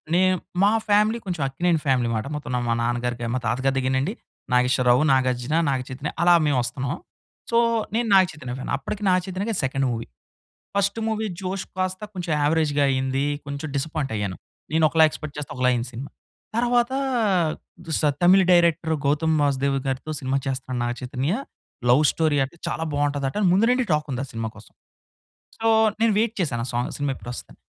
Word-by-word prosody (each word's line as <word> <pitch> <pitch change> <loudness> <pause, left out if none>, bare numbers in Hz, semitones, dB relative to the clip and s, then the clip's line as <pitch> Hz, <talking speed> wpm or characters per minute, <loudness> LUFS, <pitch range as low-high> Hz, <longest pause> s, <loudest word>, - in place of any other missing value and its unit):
నేను 185 0 +4 0.3
మా 205 - +5 0.2
ఫ్యామిలీ 210 +3 +3
కొంచెం 175 -5 -3
అక్కినేని 165 +5 +1
ఫ్యామిలీ 125 -4 +2
మాట. 110 - -2
మొత్తం 145 -4 -5 0.2
మా - - +3
నాన్నగారికి 120 0 -1
మా 130 - 0
తాతగారి 130 +4 0
దగ్గరనండి 130 +7 0 0.4
నాగేశ్వరరావు, 125 0 +4
నాగార్జున, 130 +2 +1
నాగచైతన్య 130 +2 -3
అలా 175 0 +6
మేము 145 -3 +2
వస్తున్నాం. 125 +2 -3 0.6
సో, 230 - +3 0.4
నేను 235 0 +1
నాగచైతన్య 155 -9 +2
ఫ్యాన్. - - -5
అప్పటికి 210 0 -6
నాగచైతన్యకి 185 +4 0
అది - - -1
సెకండ్ 135 +1 0
మూవీ. 115 -1 -4 0.7
ఫస్ట్ 200 +2 +1
మూవీ 220 0 -1
'జోష్' 190 +1 -4
కాస్త 185 0 -1
కొంచెం 175 -3 -3
యావరేజ్‌‌గా 145 -1 +2
అయింది. 130 +1 0 0.2
కొంచెం 140 +2 -5
డిస్సపాయింట్ 140 -2 -2
అయ్యాను. 100 -3 -3 0.4
నేను 160 0 +3
ఒకలా 160 +1 +5
ఎక్స్‌పెక్ట్ 155 -1 -8
చేస్తే 150 0 -5
ఒకలా 125 0 +2
అయ్యింది 120 0 -1
సినిమా. 135 +4 -7 0.5
తర్వాత 240 +1 +2 0.9
చూస్త 160 -1 -1 0.2
తమిళ్ 185 +2 +6
డైరెక్టర్ 170 -2 +3
గౌతమ్ 155 +2 +2
వాసుదేవ్‌గారితో 135 0 -1
సినిమా 135 0 -1
చేస్తున్నాడు 130 -1 -3
నాగ 120 - -1
చైతన్య, 130 +4 -2 0.6
'లవ్ 125 +5 +6
స్టోరీ' 155 -3 +1
అంట 135 - -9
చాలా 160 - -2
బాగుంటదట 145 -2 -1
అని 195 - +3
ముందు 200 +5 +4
నుండి 250 0 +2
టాక్ 150 0 +1
ఉంది 125 - -2
ఆ - - -9
సినిమా 115 0 -3
కోసం. 110 - -15 0.9
సో, 225 - -2 0.3
నేను 225 -1 +4
వెయిట్ 230 0 0
చేశాను 120 -8 -1
ఆ - - -4
సాంగ్ 120 +1 -1
సినిమా 145 -1 0
ఎప్పుడొస్తదని. 120 0 -9
145 Hz, 165 wpm, -24 LUFS, 130-175 Hz, 0.9 s, అలా